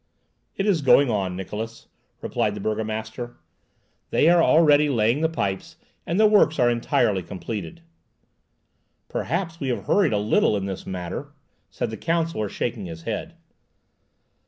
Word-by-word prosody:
"It 195 - -1
is 190 -7 +2
going 135 -1 +5
on, 95 -4 -1
Niklausse," 110 +4 -6 0.4
replied 105 -1 -1
the - - -6
burgomaster. 110 +3 -4 0.7
"They 160 - +4
are 175 0 +5
already 150 -2 +5
laying 120 +2 +2
the 160 - +2
pipes, 160 - -3 0.3
and 170 +4 0
the 215 - +6
works 210 -7 +4
are 120 -2 +4
entirely 110 -4 +1
completed." 105 - -6 1.3
"Perhaps 170 +2 -3
we 140 - -3
have 120 - -2
hurried 190 - +3
a - - +2
little 105 0 +2
in 95 - -3
this 95 -1 -6
matter," 95 +10 -5 0.4
said 120 -3 -3
the 110 - -6
counsellor, 165 -10 -1
shaking 110 -4 -3
his 80 -1 -9
head. 155 - -4
120 Hz, 145 wpm, -24 LUFS, 105-160 Hz, 1.3 s, the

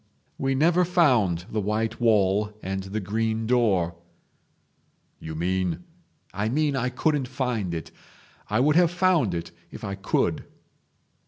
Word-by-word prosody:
"We 135 0 0
never 170 +6 +4
found 125 - +2
the 110 - -1
white 110 +3 -2
wall 105 -2 +2
and 95 +1 -3
the 100 +3 -3
green 110 +3 -1
door.. 100 -8 +2 0.6
." - - -43
"You 80 0 -7
mean?—" 90 - -1 0.5
"I 105 +2 -1
mean 145 +2 +1
I 125 -1 0
couldn't 140 +1 0
find 125 -7 -2
it. 80 - -6 0.6
I 110 +3 +2
would 150 +3 +3
have 175 -2 +5
found 175 - +2
it 85 0 -5 0.2
if - - -11
I 100 - -3
could. 95 -1 -1
110 Hz, 145 wpm, -25 LUFS, 95-135 Hz, 0.6 s, have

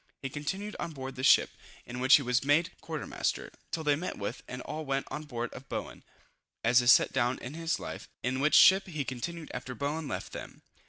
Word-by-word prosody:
He 135 - -2
continued 190 +9 -4
on 165 - -4
board 135 -1 -6
this 130 +2 +2
ship, - - +6 0.3
in 120 +1 -6
which 130 +1 +7
he 140 - +3
was 125 +1 +1
made 160 +5 +3
quarter 160 -2 -5
master, - - -2 0.2
till 160 - -3
they 145 -1 +3
met 180 +5 -4
with, 100 +4 -4
and 125 0 -6
all 155 - -5
went 135 -1 -1
on 155 - -5
board 120 -4 -4
of 135 - -11
Bowen, - - -5 0.6
as 120 +2 +5
is 120 +1 +6
set - - +5
down 130 -1 +1
in 125 - -8
his 165 0 -1
life, - - -7
in 130 +2 0
which 150 +3 +3
ship 190 +1 +7
he 155 -6 -3
continued 155 +6 -5
after 125 0 -5
Bowen 145 +3 -2
left - - -5
them. - - -9
140 Hz, 220 wpm, -30 LUFS, 125-160 Hz, 0.6 s, which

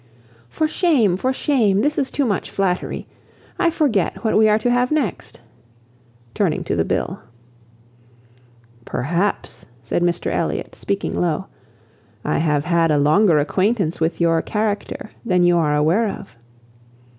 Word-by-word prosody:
"For 315 - 0
shame! 285 - +2
for 255 +8 -1
shame! 230 -8 +1
this 295 +4 0
is 275 - -1
too 285 - -1
much 205 -5 -1
flattery. 185 -2 -2 0.5
I 345 - +3
forget 275 - 0
what 220 - +1
we 215 0 +5
are 210 - +4
to 245 +3 0
have 245 +1 +2
next," 285 - -2 0.9
turning - - 0
to - - -2
the - - +1
bill. - - -2 1.6
"Perhaps," 170 - -2 0.2
said 115 - -1
Mr 175 0 0
Elliot, - - -2
speaking 200 0 -3
low, 175 +1 -1 0.8
"I - - 0
have 150 -2 +1
had 170 -2 +2
a 150 - +3
longer 155 +4 +4
acquaintance 185 +3 0
with 160 +1 -1
your 165 -1 +2
character 210 0 -3
than 180 -6 +2
you 175 0 +4
are 150 -2 +1
aware 165 +10 +2
of." 195 - -7
195 Hz, 145 wpm, -20 LUFS, 165-230 Hz, 1.6 s, we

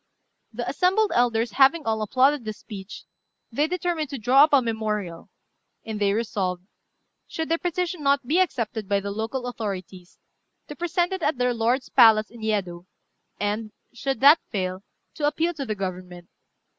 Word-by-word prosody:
The - - -5
assembled 390 +4 +2
elders 235 -1 +1
having 280 +7 +4
all 220 -1 0
applauded 260 +5 +2
this 215 -1 -6
speech, 200 -1 -10 0.5
they 290 +6 +1
determined 345 -3 -2
to 275 - -5
draw 255 +5 +5
up - - -7
a 285 - +6
memorial; 215 -7 -3 0.6
and 220 -1 -5
they 200 -1 +3
resolved, 190 -5 -2 0.6
should 320 -1 -4
their 330 0 +1
petition 355 -1 -2
not 280 -1 +2
be 315 +8 +2
accepted 230 - -1
by 200 -1 +2
the 200 0 -5
local 225 +5 -4
authorities, 190 -6 -6 0.5
to 295 - -7
present 345 +2 -1
it 380 - -4
at 300 -3 0
their 250 0 +1
lord's 240 +3 0
palace 215 -2 +5
in 235 -1 -13
Yedo, 190 -5 -2 0.5
and, 210 +1 -2 0.2
should 265 +3 -3
that 290 +4 +8
fail, 185 -3 -3 0.3
to 295 - -1
appeal 330 +3 0
to 280 -5 -6
the 215 - -2
Government. 180 -2 -6
230 Hz, 165 wpm, -24 LUFS, 205-295 Hz, 0.6 s, that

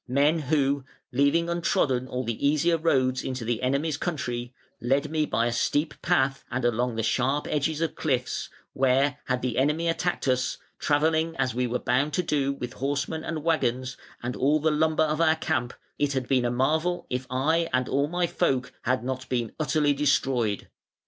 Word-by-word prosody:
Men 145 +5 +3
who, 140 -2 +2 0.3
leaving 140 +6 +2
untrodden 145 -7 +1
all 125 0 -3
the 115 0 -4
easier 155 +4 +3
roads 130 -5 +1
into 130 -3 -4
the 115 0 -1
enemy's 140 +4 0
country, 125 -8 -3 0.3
led 140 +5 +1
me 155 -1 +1
by 115 - +1
a 120 - 0
steep 145 +6 0
path 135 0 +1
and 125 0 -2
along 120 0 +1
the 115 - -1
sharp 130 +6 +1
edges 155 +1 -1
of 165 -2 0
cliffs, 130 -5 -1 0.2
where, 135 +2 +2
had 125 -1 -1
the 125 -1 0
enemy 150 +5 +1
attacked 170 -2 -1
us, 130 0 +1 0.2
travelling 160 +2 +1
as 130 - 0
we 125 +1 0
were 120 +1 -1
bound 130 +5 0
to 180 - +1
do 140 -4 +1
with 125 -3 -6
horsemen 145 +4 -2
and 160 -2 -4
waggons 130 -6 0 0.3
and 120 +1 -3
all 145 +4 +2
the 160 +1 +2
lumber 155 +1 +2
of 155 +1 0
our 160 -1 +4
camp, 160 -6 -1 0.3
it 145 -1 +1
had 130 -2 -2
been 130 -3 +2
a - - +2
marvel 155 +8 0
if 130 +1 -2
I 160 +6 +1
and 130 0 +1
all 140 +2 +1
my 175 +2 0
folk 130 -6 0
had 130 -1 0
not 130 0 -4
been 120 -3 -1
utterly 150 -1 +2
destroyed. 135 -7 +1
140 Hz, 185 wpm, -26 LUFS, 125-155 Hz, 0.3 s, our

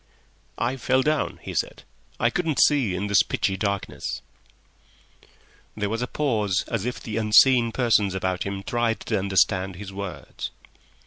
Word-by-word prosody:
"I 125 +3 -1
fell 130 +1 +2
down," 150 +1 0
he - - -6
said; - - -2 0.4
"I 120 - +2
couldn't 165 -2 -1
see 130 -11 +4
in 95 +3 -2
this 100 -1 +4
pitchy 95 - -1
darkness." 100 0 -3 1.5
There 105 -1 -1
was 115 +1 -2
a 125 - -1
pause 110 -11 0
as 115 -2 -2
if 125 - -3
the 110 -1 -5
unseen 115 +2 +5
persons 110 -6 +2
about 95 -1 -1
him 100 0 -3
tried 120 0 0
to 110 -3 -1
understand 95 -1 +1
his 95 +1 -8
words. 100 -3 -6
105 Hz, 150 wpm, -24 LUFS, 95-120 Hz, 1.5 s, unseen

